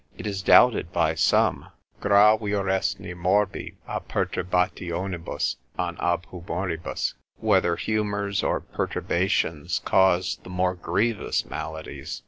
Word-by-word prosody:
It - - -7
is 100 -2 -2
doubted 110 -3 +5
by 85 -3 +2
some, 75 -4 +2 0.3
Gravioresne 100 -2 +2
morbi 95 +3 0
a - - -2
perturbationibus, 90 -4 -2 0.2
an 85 -1 -2
ab 85 0 0
humoribus, 90 -1 -3 0.2
whether 85 0 +2
humours 100 +1 -1
or - - 0
perturbations 85 -4 -1
cause 95 -1 +2
the - - -12
more 90 0 0
grievous 105 +5 -1
maladies. 80 0 -6
90 Hz, 105 wpm, -25 LUFS, 85-100 Hz, 0.3 s, doubted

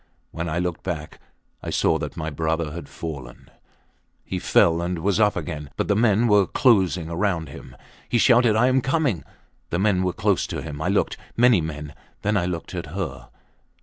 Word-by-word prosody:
When 80 +1 -4
I 80 - -2
looked 90 -1 -2
back 80 -4 -5 0.4
I - - -5
saw - - +2
that - - -6
my 80 0 -3
brother 80 +1 -1
had 85 +2 -8
fallen. 70 -7 -8 0.7
He - - -3
fell 85 0 +3
and 90 +1 -2
was 100 +5 0
up 105 -1 +4
again, 75 -4 -5
but - - -1
the 105 - +2
men 110 +1 +3
were 105 -3 +4
closing 95 - +3
round 85 -3 -1
him. - - -11 0.3
He 120 - +2
shouted, 120 -2 +5
I 110 +3 +4
am 130 +1 +3
coming! 130 - 0 0.5
The 85 - -1
men 95 -1 +2
were 90 -1 +1
close - - +1
to - - -5
him. 75 -1 -6
I - - -1
looked. - - +1 0.2
Many 120 -5 +5
men. 75 -2 -6 0.3
Then 105 +1 +1
I 90 -3 +1
looked 85 0 -5
at 85 -3 -4
her. 90 +2 -5
90 Hz, 190 wpm, -23 LUFS, 80-105 Hz, 0.7 s, shouted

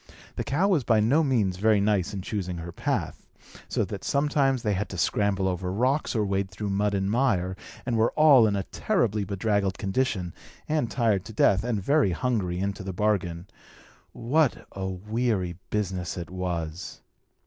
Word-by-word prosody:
The - - -2
cow 170 +8 +1
was 175 -9 +2
by 110 -2 +3
no 135 +10 +3
means 110 -10 +1
very 105 +1 +3
nice 100 -2 +1
in 100 -3 -5
choosing 90 -4 -3
her 85 +1 -6
path; - - -3 0.4
so - - 0
that - - -7
sometimes 140 -3 +1
they 105 - +1
had 100 +2 -2
to 95 - -6
scramble 95 +2 +1
over 90 0 -2
rocks, 130 +8 0
or 110 -2 +1
wade 100 -1 -1
through 100 +2 -4
mud 100 +1 +1
and 95 0 0
mire, 100 -6 +1 0.3
and 120 -2 -1
were 115 +1 +3
all 140 -7 +6
in 100 - 0
a 100 - -1
terribly 110 - 0
bedraggled 100 0 0
condition, 95 -4 -1 0.3
and 150 -6 0
tired 110 -7 +1
to 110 - -9
death, 100 -1 +3
and 115 -5 -2
very 140 - +3
hungry, 100 -7 -1
into 100 +1 -2
the 95 0 -5
bargain. 90 -4 -1 0.7
What 140 +4 +1
a 95 -1 -4
weary 95 -2 -2
business 95 -4 -2
it 85 0 -6
was! 90 -2 -4
100 Hz, 175 wpm, -26 LUFS, 95-120 Hz, 0.7 s, all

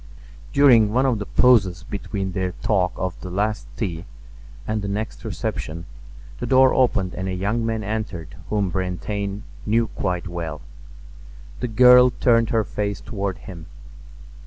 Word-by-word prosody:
During 120 -7 +5
one 130 +4 +2
of 125 -5 +1
the 105 - -5
pauses 100 -8 +3
between 100 -1 -4
their 90 -1 -2
talk 95 -4 +2
of 95 -1 -3
the 90 - -6
last 105 +3 -2
tea 90 -5 -3 0.6
and 110 0 -1
the 100 - -4
next 105 +2 -4
reception 85 +2 -4 0.5
the - - -3
door 130 0 +5
opened 105 -8 +2
and 95 +1 -4
a 95 - -2
young 105 +5 -1
man 115 -1 -2
entered 100 -6 -4
whom 100 -3 0
Brantain 100 +3 -3 0.2
knew 115 +1 +1
quite 90 0 -3
well. 85 -3 -5 1.0
The - - -2
girl 125 +2 +7
turned 115 -2 +3
her 115 -1 +2
face 100 0 -3
toward 100 -3 -4
him. 85 -4 -9
100 Hz, 150 wpm, -22 LUFS, 95-115 Hz, 1.0 s, girl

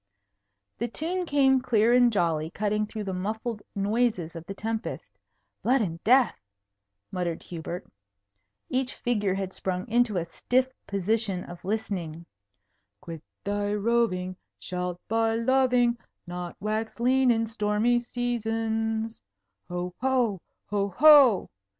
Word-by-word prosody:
The 235 - 0
tune 350 +8 -2
came 270 -3 +4
clear 235 -2 +3
and 245 -1 +5
jolly, 165 -6 0
cutting 210 +3 -1
through 215 0 -5
the 195 -2 -3
muffled 215 +4 -3
noises 200 -4 0
of 165 - -6
the 195 - -4
tempest. 225 +2 -4 0.5
"Blood 260 +3 +3
and 170 -5 -3
death!" 250 +2 +4 0.7
muttered 175 -3 -3
Hubert. 170 +1 -6 0.8
Each 260 0 -1
figure 210 -6 0
had 190 -1 -3
sprung 185 +2 -3
into 235 -3 +2
a 170 - -1
stiff 255 +9 0
position 200 -1 -1
of 175 0 -11
listening. 180 -5 -3 0.7
"Quit 165 -4 -8 0.2
thy 205 0 -1
roving; 205 -4 +1 0.2
Shalt 180 -1 -4
by 225 0 +1
loving 245 0 +3 0.3
Not 175 0 -6
wax 215 +2 -3
lean 255 +2 +3
in 225 -1 +3
stormy 220 +2 +1
seasons. 225 -2 -2 0.5
Ho! 180 0 -3
ho! 250 -8 +1 0.3
oh, 200 -1 +1
ho! 285 -8 +7
220 Hz, 125 wpm, -27 LUFS, 185-240 Hz, 0.8 s, ho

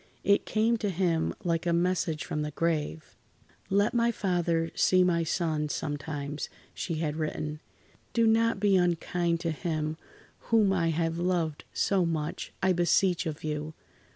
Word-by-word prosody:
It 200 +1 +3
came 225 +2 +2
to 210 -2 -1
him 170 -3 0
like 170 -1 0
a 170 - +2
message 170 -2 0
from 150 - -2
the 150 - -2
grave: 155 0 -2 0.5
"Let 200 +2 +2
my 235 0 +3
father 170 -5 0
see 185 0 +4
my 170 -2 +2
son, 155 -2 -1
sometimes," 145 -1 -4 0.2
she 170 - -3
had 155 -1 -2
written. 155 -1 -3 0.5
"Do 230 -1 +3
not 225 -1 +3
be 200 -1 +3
unkind 175 -1 +1
to 170 -1 -1
him 155 -1 -2 0.5
whom 215 -4 +4
I 170 -3 +1
have 165 +1 -1
loved 170 -4 -1
so 195 -2 +2
much, 160 -2 -3
I 190 -1 +4
beseech 175 0 +2
of 155 -1 -5
you. 155 0 -3
170 Hz, 155 wpm, -29 LUFS, 155-185 Hz, 0.5 s, see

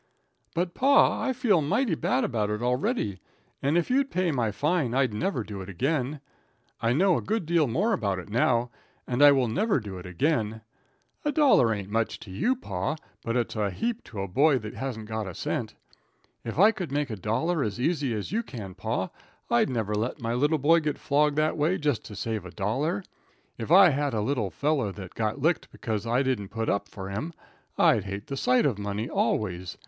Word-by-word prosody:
"But, 175 +1 -1
pa, 280 +2 +4
I - - 0
feel 235 -9 +2
mighty 185 - +1
bad 140 - +1
about 110 -5 0
it 105 +2 -2
already, 125 - 0 0.4
and 145 +5 +2
if 175 - 0
you'd 275 +1 +2
pay 185 -1 0
my 120 -6 0
fine 145 - 0
I'd 130 -4 +2
never 125 - -1
do 100 -2 -7
it 95 - -8
again. 135 - -1 0.6
I 115 - +2
know 175 +6 +3
a - - -2
good 215 -3 -1
deal 165 -2 +2
more 195 - +1
about 100 -5 0
it 90 - -7
now, 120 +2 +1 0.3
and 125 +2 -1
I 145 0 +9
will 135 -3 +3
never 200 - +1
do 100 -5 -7
it 90 - -9
again. 110 - 0 0.6
A 295 - +1
dollar 270 - +4
ain't 100 -2 -4
much 115 +1 -1
to 100 - -10
you, 240 - +1
pa, 95 - -3 0.3
but 115 +1 -1
it's 120 -1 -1
a 105 -2 0
heap 230 - -3
to 100 - -6
a 100 - -3
boy 140 - +3
that 110 -3 -6
hasn't 125 -5 -5
got 110 -2 -3
a 95 - -7
cent. - - -3 0.7
If 115 - -5
I 205 +6 +7
could 185 -8 -5
make 145 -2 -1
a - - -2
dollar 140 - 0
as 105 0 -3
easy 145 -1 0
as 105 - -4
you 225 +3 +1
can, 110 - -8
pa, - - -3 0.4
I'd 120 - +3
never 110 -5 -1
let 110 +7 -2
my 115 -1 -2
little 145 +6 +2
boy 160 +4 +4
get 150 -2 -2
flogged 150 0 +2
that 155 +1 +1
way 160 +5 +2
just 145 -6 0
to 105 - -9
save 110 0 -3
a 90 - -8
dollar. 135 - -1 0.6
If 115 - -5
I 185 +2 +8
had 145 -3 0
a 105 - 0
little 115 -3 -1
feller 135 - 0
that 95 -3 -9
got 110 +4 -2
licked 165 +4 +1
bekuz 110 -4 -4
I 125 +4 +2
didn't 130 -7 -1
put 115 0 -2
up 100 0 -1
for 95 -1 -7
him, 145 +13 -4 0.4
I'd 105 -4 +4
hate 100 +1 -5
the 140 - -5
sight 125 +1 +2
of 125 -8 0
money 105 +2 -3
always. 90 -6 -1
125 Hz, 210 wpm, -27 LUFS, 105-155 Hz, 0.7 s, I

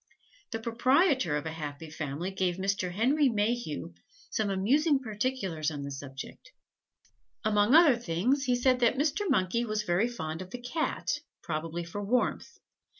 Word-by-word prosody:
The 225 - -3
proprietor 235 - +2
of 150 - -5
a 160 - -3
happy 150 0 -7
family 155 +4 -4
gave 185 -2 0
Mr. 190 -1 -1
Henry 265 +9 +3
Mayhew 205 - -1 0.4
some 215 -2 0
amusing 275 - +3
particulars 210 - -2
on 145 -2 -5
the 140 - -5
subject. 135 0 -9 0.9
Among 210 +4 +4
other 320 -7 +7
things, 240 - 0
he 250 -1 +2
said 250 +1 +3
that 240 +1 +3
Mr. 320 +8 0
Monkey 190 +6 +2
was 215 -2 -1
very 185 +4 +2
fond 160 -9 -5
of 185 - -8
the 245 - -6
Cat, 290 +3 -2 0.2
probably 165 +1 -3
for 170 +5 -6
warmth. 245 +5 0
205 Hz, 150 wpm, -29 LUFS, 165-250 Hz, 0.9 s, other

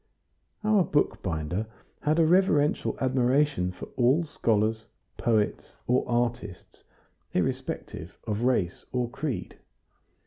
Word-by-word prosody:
Our 215 -3 +4
bookbinder 95 - -1 0.3
had 155 +2 +1
a 165 - +5
reverential 160 -4 +3
admiration 130 -5 +2
for - - -8
all 130 +7 +4
scholars, 110 -6 0 0.3
poets, 110 -3 0
or 125 +1 +2
artists, 120 -6 -2 0.5
irrespective - - -3
of 105 +1 -2
race 120 -8 +1
or 125 -2 -1
creed. 140 -1 -4
125 Hz, 100 wpm, -27 LUFS, 110-145 Hz, 0.5 s, a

